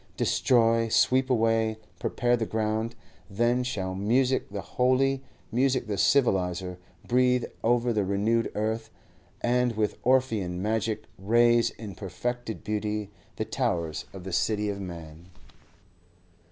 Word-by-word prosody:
Destroy, 115 -2 +3
sweep 130 +3 +3
away, 115 -2 +2 0.2
prepare 120 0 +1
the 115 -2 -2
ground; 110 +1 -1 0.3
then 120 +5 +1
shall 95 -7 -3
music 125 +7 +1
the 100 0 -5
holy, 130 +3 +1 0.3
music 130 +1 +1
the 105 - -3
civiliser, 95 -8 +1 0.3
breathe 125 0 +3 0.2
over 120 +1 +2
the 105 -2 +1
renewed 105 +4 +1
earth, 110 +1 -2 0.5
and 125 0 +2
with 105 -1 -1
Orphean 115 -9 +1
magic 110 +1 -1 0.2
raise 120 +3 +4
in 105 -4 -9
perfected 115 +5 -4
beauty 105 -1 -2 0.2
the - - -2
towers 80 -3 -2
of 95 -2 -9
the 95 -1 -6
City 105 +2 +1
of 100 -1 -4
Man. 85 -1 -9
110 Hz, 125 wpm, -27 LUFS, 100-120 Hz, 0.5 s, raise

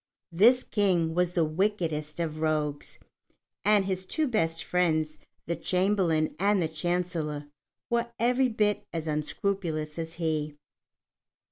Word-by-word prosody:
This 235 +9 +5
King 180 -6 +1
was 180 0 +1
the 170 -3 +2
wickedest 160 -3 -1
of 155 -2 -2
rogues, 150 -2 -1 0.7
and 205 -1 +4
his 190 -1 -2
two 310 - 0
best 165 -9 0
friends, 155 -4 0 0.3
the 170 - -1
Chamberlain 180 -2 +1
and 200 +1 +3
the 165 - +1
Chancellor, 160 -2 -2 0.4
were 235 0 0
every 250 +3 +3
bit 210 -2 +1
as 165 -2 -3
unscrupulous 155 0 -2
as 165 0 -4
he. 155 -3 -1
170 Hz, 125 wpm, -28 LUFS, 155-200 Hz, 0.7 s, This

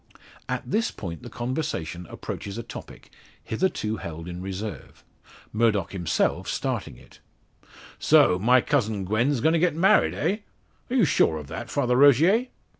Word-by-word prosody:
At - - -2
this 225 +1 +1
point 85 -5 -7
the 120 - -9
conversation 120 - -4
approaches 100 +1 -6
a 115 - -4
topic, - - -11 0.3
hitherto 110 - -1
held 85 -2 -7
in 90 0 -6
reserve, 95 +2 -7 0.5
Murdock 110 -4 +1
himself 90 -6 0
starting - - -3
it: - - -18 0.8
"So, 90 - +5
my 125 +5 +5
cousin 110 -9 0
Gwen's 120 +6 +1
going 160 +2 +3
to 165 - +3
get 170 -2 +2
married, 195 +6 +4
eh! 200 - 0 0.5
are 250 - -2
you 235 -8 +5
sure 80 - +2
of 75 - -7
that, - - -6
Father 125 -3 +1
Rogier?" 155 - +5
115 Hz, 150 wpm, -25 LUFS, 95-150 Hz, 0.8 s, So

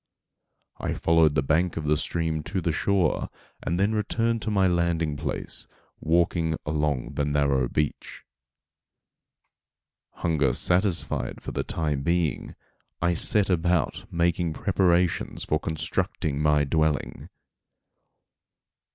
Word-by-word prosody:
I - - -2
followed 80 -2 +3
the 70 - +2
bank 80 +5 +1
of 80 - -3
the 75 +1 +3
stream 80 0 -1
to 95 - -2
the 85 -1 0
shore, 90 +1 +1 0.3
and 85 +2 -2
then 100 +3 +2
returned 115 +2 0
to 110 - -3
my 100 -2 +3
landing 85 -3 +1
place, 70 -2 -3 0.3
walking 80 0 +1
along 75 -4 -1
the 75 - -1
narrow 70 -3 +1
beach. 75 -1 -3 1.9
Hunger 75 -7 +1
satisfied 90 0 0
for - - -5
the - - -2
time 75 -4 -2
being, 85 0 -1 0.4
I 85 +1 +2
set 100 +4 +2
about 85 -2 0
making 85 -1 +1
preparations 90 -2 +1
for 75 - +1
constructing 80 0 -2
my 75 -1 +3
dwelling. 80 0 -1
80 Hz, 115 wpm, -26 LUFS, 75-90 Hz, 1.9 s, followed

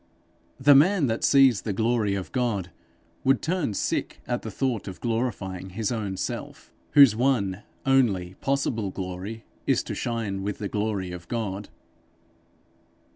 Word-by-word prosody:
The 145 +2 +7
man 165 +4 +5
that 115 -2 -1
sees 135 -6 +5
the 105 - -3
glory 110 -1 +1
of 95 -2 -5
God, 110 -8 -1 0.5
would 135 -1 +4
turn 165 - -1
sick - - -2
at 120 -1 -2
the 110 - -6
thought 120 0 -2
of 95 - -7
glorifying 110 -6 -2
his 105 +4 -2
own 105 -5 -3
self, - - -5 0.2
whose 140 -7 +8
one 110 -6 +1 0.2
only 105 -10 +2
possible 130 -7 0
glory 95 +4 -6 0.2
is - - +3
to - - -5
shine 110 -5 -2
with 100 +1 -3
the 105 - -3
glory 105 -3 -2
of 85 -1 -8
God. 105 -4 -3
110 Hz, 145 wpm, -26 LUFS, 95-125 Hz, 0.5 s, whose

